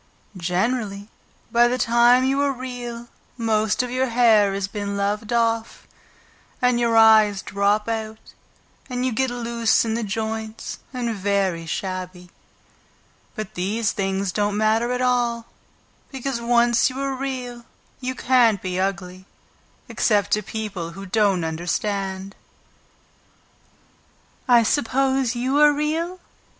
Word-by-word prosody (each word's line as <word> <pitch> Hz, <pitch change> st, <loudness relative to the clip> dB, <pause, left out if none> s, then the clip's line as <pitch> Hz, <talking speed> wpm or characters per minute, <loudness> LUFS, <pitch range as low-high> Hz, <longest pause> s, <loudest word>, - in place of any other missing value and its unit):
Generally, 200 Hz, +3 st, -2 dB, 0.4 s
by 240 Hz, +1 st, +5 dB
the 250 Hz, +1 st, 0 dB
time 240 Hz, +1 st, +4 dB
you 270 Hz, +2 st, +1 dB
are 285 Hz, -1 st, +2 dB
Real, 245 Hz, -2 st, -7 dB, 0.3 s
most 220 Hz, 0 st, +1 dB
of 250 Hz, -, -5 dB
your 260 Hz, +1 st, 0 dB
hair 225 Hz, -4 st, +4 dB
has 195 Hz, -1 st, -2 dB
been 200 Hz, 0 st, -4 dB
loved 210 Hz, +2 st, -2 dB
off, 230 Hz, -1 st, 0 dB, 0.7 s
and 250 Hz, -1 st, +2 dB
your 230 Hz, -1 st, +2 dB
eyes 215 Hz, -3 st, +5 dB
drop 200 Hz, +2 st, 0 dB
out 220 Hz, -1 st, -5 dB, 0.6 s
and 250 Hz, 0 st, -2 dB
you 260 Hz, -, 0 dB
get 260 Hz, +3 st, 0 dB
loose 235 Hz, -2 st, +1 dB
in 220 Hz, -, -1 dB
the 230 Hz, -, -1 dB
joints 220 Hz, +1 st, -4 dB
and 245 Hz, -3 st, -2 dB
very 195 Hz, -4 st, -1 dB
shabby. 185 Hz, 0 st, -5 dB, 1.0 s
But 215 Hz, -4 st, -6 dB
these 205 Hz, +5 st, -1 dB
things 195 Hz, -1 st, -2 dB
don't 205 Hz, +1 st, -1 dB
matter 220 Hz, +3 st, +2 dB
at 250 Hz, 0 st, -1 dB
all, 240 Hz, -2 st, 0 dB, 0.7 s
because 265 Hz, -2 st, -4 dB
once 235 Hz, 0 st, +3 dB
you 260 Hz, +1 st, -7 dB
are 275 Hz, 0 st, -2 dB
Real 255 Hz, -3 st, -5 dB, 0.4 s
you 255 Hz, 0 st, -4 dB
can't 240 Hz, -5 st, +3 dB
be 185 Hz, 0 st, -3 dB
ugly, 185 Hz, 0 st, -3 dB, 0.6 s
except 205 Hz, -3 st, +1 dB
to 210 Hz, -, +2 dB
people 200 Hz, -5 st, -5 dB
who 195 Hz, +2 st, -9 dB
don't 195 Hz, -3 st, +1 dB
understand." 190 Hz, +4 st, -3 dB, 2.1 s
"I 240 Hz, -2 st, +6 dB
suppose 265 Hz, 0 st, +1 dB
you 260 Hz, +4 st, 0 dB
are 295 Hz, 0 st, +7 dB
real?" 320 Hz, +5 st, -2 dB
225 Hz, 130 wpm, -22 LUFS, 200-245 Hz, 2.1 s, are